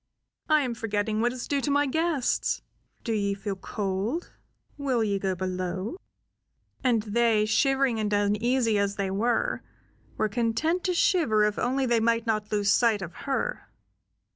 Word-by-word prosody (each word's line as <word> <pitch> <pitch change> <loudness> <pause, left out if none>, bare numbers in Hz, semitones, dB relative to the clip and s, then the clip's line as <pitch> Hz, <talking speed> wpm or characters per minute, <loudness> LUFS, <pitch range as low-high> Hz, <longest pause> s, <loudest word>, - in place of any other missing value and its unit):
"I 310 -1 +5
am 250 -4 -1
forgetting 215 -1 -1
what 240 +1 +2
is 250 -1 -6
due 280 -1 0
to 290 - -1
my 285 +1 +3
guests. 315 -1 0 0.4
Do 230 - -1
ye 200 -2 0
feel 200 0 -4
cold? 200 - -3 0.4
Will 265 -5 0
ye 200 -2 0
go 190 -1 -1
below?" 185 - -3 0.9
And 235 -4 +2
they, 220 0 +2
shivering 270 +1 +2
and 210 -1 -1
uneasy 210 +3 +2
as 200 0 0
they 195 -1 -2
were, 240 - 0 0.6
were 215 - +2
content 240 - 0
to 365 -1 +1
shiver 305 - +3
if 210 0 0
only 265 +2 +1
they 235 -2 +2
might 230 +1 +1
not 215 -2 -1
lose 205 -1 +2
sight 220 -4 +3
of 170 - -7 0.2
her. - - -2
225 Hz, 160 wpm, -27 LUFS, 205-265 Hz, 0.9 s, I